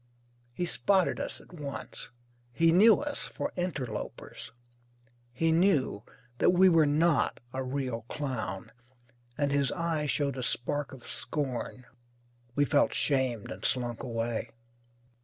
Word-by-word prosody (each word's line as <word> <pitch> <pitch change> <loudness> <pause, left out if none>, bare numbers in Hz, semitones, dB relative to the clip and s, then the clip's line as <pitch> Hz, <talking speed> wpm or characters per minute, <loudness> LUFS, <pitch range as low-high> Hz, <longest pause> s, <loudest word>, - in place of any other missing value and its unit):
He 175 - -1
spotted 190 +1 +2
us - - -4
at - - -17
once. 140 -5 -7 0.4
He 165 +3 +4
knew 210 +6 +7
us 290 -1 -3
for 285 - -5
interlopers. 130 - -5 0.8
He 160 +7 +1
knew 160 - +2 0.4
that - - +5
we 185 +1 +6
were 165 -3 +5
not 155 +2 +2
a 130 - -2
real 130 -3 -3
clown, 110 -11 -4 0.7
and 145 -1 +1
his 140 -2 +2
eye 165 -3 -1
showed 140 -2 0
a - - -3
spark 140 +4 0
of 130 -3 -12
scorn. 130 -3 -4 0.7
We 145 - +3
felt 145 0 +2
shamed, 130 -6 +1
and - - -8
slunk 120 -2 0
away.) 115 -2 -2
140 Hz, 130 wpm, -29 LUFS, 125-165 Hz, 0.8 s, knew